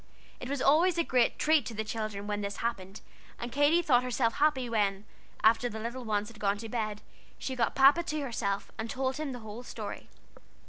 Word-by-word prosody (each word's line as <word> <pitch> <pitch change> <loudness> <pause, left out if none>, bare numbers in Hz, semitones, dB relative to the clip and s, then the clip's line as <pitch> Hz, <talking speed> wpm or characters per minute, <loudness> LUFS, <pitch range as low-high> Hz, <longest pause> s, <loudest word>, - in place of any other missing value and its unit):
It 250 - -6
was 280 -1 -1
always 335 +5 +4
a 335 - +3
great 250 -6 +2
treat 310 -1 +3
to 230 - -6
the 220 - -2
children 215 -2 -4
when 205 0 -2
this 200 0 -4
happened, 195 -4 -4 0.4
and 240 0 -6
Katy 290 +6 +3
thought 250 -6 +4
herself 250 -2 0
happy 280 -4 +2
when, 205 -3 0 0.4
after 230 +2 +4
the 220 - -6
little 235 +3 -5
ones 210 -2 -1
had 225 -2 -14
gone 200 0 +1
to 225 +1 -7
bed, 215 -3 -3 0.3
she 260 - -4
got 235 -2 0
Papa 275 +5 +6
to 310 -3 -3
herself, 220 -7 -2
and 225 +1 -3
told 265 0 -1
him 305 -2 -3
the 250 - -5
whole 220 +2 -8
story. 250 - -7
235 Hz, 210 wpm, -30 LUFS, 215-270 Hz, 0.4 s, Papa